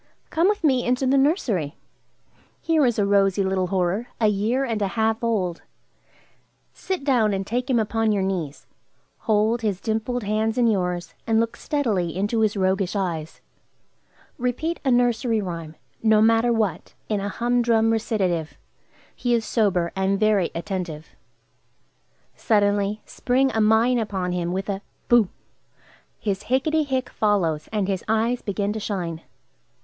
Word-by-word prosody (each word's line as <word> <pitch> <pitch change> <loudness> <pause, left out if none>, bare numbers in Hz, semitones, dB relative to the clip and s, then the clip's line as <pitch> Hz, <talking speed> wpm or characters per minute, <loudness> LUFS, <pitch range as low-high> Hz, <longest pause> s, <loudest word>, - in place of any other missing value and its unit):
Come 335 +3 +3
with 415 -3 -1
me 260 -5 +3
into 250 +2 0
the 260 +1 +3
nursery. 260 - +1 0.8
Here 315 -5 +2
is 240 - 0
a 205 - +2
rosy 200 -1 +3
little 190 -1 0
horror, 190 +5 0
a 215 -2 +4
year 220 +7 0
and 225 -4 -2
a 200 - +2
half 225 +1 +1
old. 190 -7 -1 1.1
Sit 375 -6 -4
down 235 -7 +2
and 195 0 -3
take 245 +5 -2
him 255 - +3
upon 225 0 +1
your 200 -2 +1
knees. 175 -7 -3 0.5
Hold 220 +2 +1
his 205 -5 -1
dimpled 225 +3 -2
hands 215 +2 0
in 245 - +3
yours, 180 -5 0
and 225 -1 +3
look 230 0 -1
steadily 210 - -1
into 205 +4 0
his 215 -1 +1
roguish 190 0 0
eyes. 170 -5 -3 1.0
Repeat 250 +8 -2
a 270 - +1
nursery 240 -2 +2
rhyme, 165 -5 -5 0.3
no 220 -1 +4
matter 225 +2 +4
what, 215 -7 -1
in 210 -2 0
a 200 +1 -3
humdrum 235 -1 +2
recitative; 190 -8 -1 0.6
he 245 -1 +1
is 225 -2 -1
sober, 190 -8 +1
and 190 +1 0
very 210 -5 +2
attentive. 170 -3 -5 1.3
Suddenly 205 -1 +1
spring 260 +2 +1
a 220 - +1
mine 225 +3 +4
upon 190 -5 -2
him 175 -1 -2
with 190 +1 -3
a 200 -1 -3 0.3
"Boo!" 235 -6 +5 0.9
His 200 -3 -3
"Hicketty 300 +4 +1
hick!" 260 -2 -1
follows, 170 -8 0
and 210 -3 0
his 195 -2 -2
eyes 225 +3 +1
begin 200 0 -2
to 220 - -4
shine. 175 -6 -4
215 Hz, 150 wpm, -23 LUFS, 190-240 Hz, 1.3 s, Boo